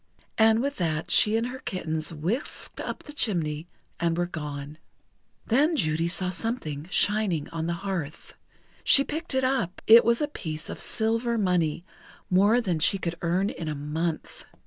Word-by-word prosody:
And 220 +2 +5
with 280 +1 -2
that 160 -3 -1
she 220 +1 +6
and 230 - 0
her 260 +1 -7
kittens 160 -7 -3
whisked 175 - -4
up - - -5
the 295 - -10
chimney, 165 - -1 0.3
and 170 -1 0
were 175 - +1
gone. 150 -3 -6 0.7
Then 295 +8 +3
Judy 160 - +1
saw 180 +1 -1
something 170 - -4
shining 200 -7 +1
on 165 0 -3
the 170 - 0
hearth. 170 -6 -4 0.5
She 275 - +6
picked 310 0 -4
it 260 - +2
up; 255 -9 0
it 230 +1 +9
was 235 +1 +2
a 295 - 0
piece 160 - -6
of - - -7
silver 230 +2 0
money, 175 -5 0 0.5
more 205 +6 +4
than 180 -8 -1
she 180 +5 +4
could 170 -3 -3
earn 180 +4 +1
in 165 -1 -6
a 155 - -2
month. 155 +3 -4
180 Hz, 170 wpm, -26 LUFS, 160-225 Hz, 0.7 s, it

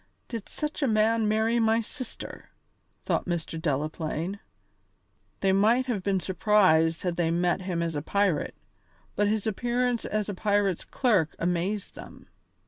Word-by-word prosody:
"Did 230 -4 -6
such 300 0 -4
a 275 - +3
man 220 0 +3
marry 220 +2 +2
my 225 0 +3
sister!" 235 +2 -7 0.6
thought - - 0
Mr. 165 -2 -3
Delaplaine. 155 +5 -2 1.0
They 195 - +3
might 220 +6 +3
have 235 -7 -2
been 195 0 +1
surprised 175 -3 +3
had 175 -2 -1
they 170 -2 +1
met 175 +2 +1
him 180 -2 -2
as 165 -1 -2
a 145 - -2
pirate, 200 0 0 0.6
but 205 +1 +2
his 215 0 0
appearance 240 +2 0
as 215 -1 -2
a 205 - -3
pirate's 200 -2 +1
clerk 210 - +1
amazed 180 +4 -1
them. - - -12
200 Hz, 145 wpm, -27 LUFS, 170-220 Hz, 1.0 s, a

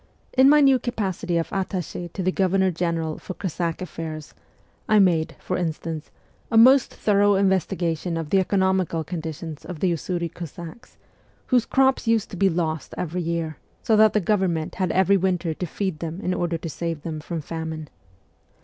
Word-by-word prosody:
In 260 +1 +7
my 300 0 +6
new 270 -2 +5
capacity 195 -7 -2
of 165 - -2
attache 185 -3 -3
to 190 - -3
the 185 - +2
Governor 190 0 +2
General 165 -2 -2
for 185 - -7
Cossack 170 0 -3
affairs, 155 -3 -7 0.6
I 215 - +5
made, 170 -5 +3
for 185 - -3
instance, 165 -2 -4 0.4
a 225 - +2
most 260 +4 +7
thorough 205 -1 +3
investigation 175 -3 0
of 160 -2 -5
the 195 - +5
economical 190 -3 +1
condition 160 -2 -6
of 175 -3 -7
the 185 +1 +2
Usuri 170 +1 -2
Cossacks, 175 - -9 0.5
whose 250 -3 +2
crops 265 -2 +2
used 225 -2 +1
to - - -6
be 195 +2 +3
lost 160 -2 -2
every 180 +1 -2
year, 165 -2 -2 0.3
so 220 - +3
that 215 0 +6
the 210 - +3
government 180 -5 0
had 185 - +1
every 190 +1 +4
winter 180 -3 0
to 180 - -4
feed 190 -1 -3
them 165 +1 -5
in 180 - -1
order 175 -2 -1
to 165 - -6
save 165 -1 -4
them 160 -2 -4
from 165 +2 -5
famine. 160 0 -5
175 Hz, 175 wpm, -24 LUFS, 165-195 Hz, 0.6 s, In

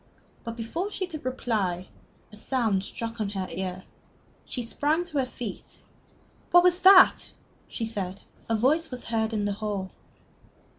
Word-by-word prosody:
But 230 0 -5
before 325 - -3
she 385 - -2
could 320 -5 -8
reply, 205 -8 -1 0.4
a - - -12
sound 215 -4 0
struck 230 +2 -5
on 205 - -1
her 195 -2 -3
ear. 185 0 -4 0.6
She 245 - -4
sprang 295 +8 0
to 305 -5 -2
her 260 - 0
feet. 235 -5 -7 0.7
"What 350 0 +7
was 360 0 +4
that?" 375 0 +7 0.4
she 230 - -4
said. 200 -4 -4 0.3
A 225 - +2
voice 300 +9 +2
was 250 -1 -7
heard 225 -1 0
in 210 -2 -1
the 205 - 0
hall. 200 -2 -4
230 Hz, 155 wpm, -27 LUFS, 205-290 Hz, 0.7 s, What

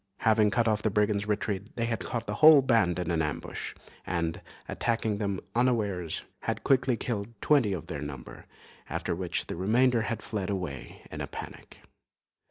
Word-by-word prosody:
Having 110 -2 +4
cut 115 +3 +1
off 110 -1 +2
the 110 - +1
brigands' 105 0 +1
retreat, 105 0 -2
they 115 - 0
had 115 -1 -1
caught 120 -2 -4
the - - -3
whole 155 -3 +9
band 115 -9 +3
in 90 -1 -2
an 80 -1 +1
ambush, 75 -3 -4 0.3
and, 85 -2 -2 0.3
attacking 110 -3 -1
them 100 -3 -1
unawares, 105 -9 0 0.2
had - - -3
quickly 130 -2 +3
killed 105 -3 -3
twenty 135 -7 +3
of 90 -5 -3
their 75 -3 -5
number, 70 -3 -8 0.4
after - - -2
which 90 0 -2
the - - -5
remainder 115 +6 +3
had 110 0 -3
fled 105 -4 -3
away 90 -9 -5
in - - -5
a - - -3
panic. - - -9
105 Hz, 175 wpm, -29 LUFS, 90-115 Hz, 0.4 s, whole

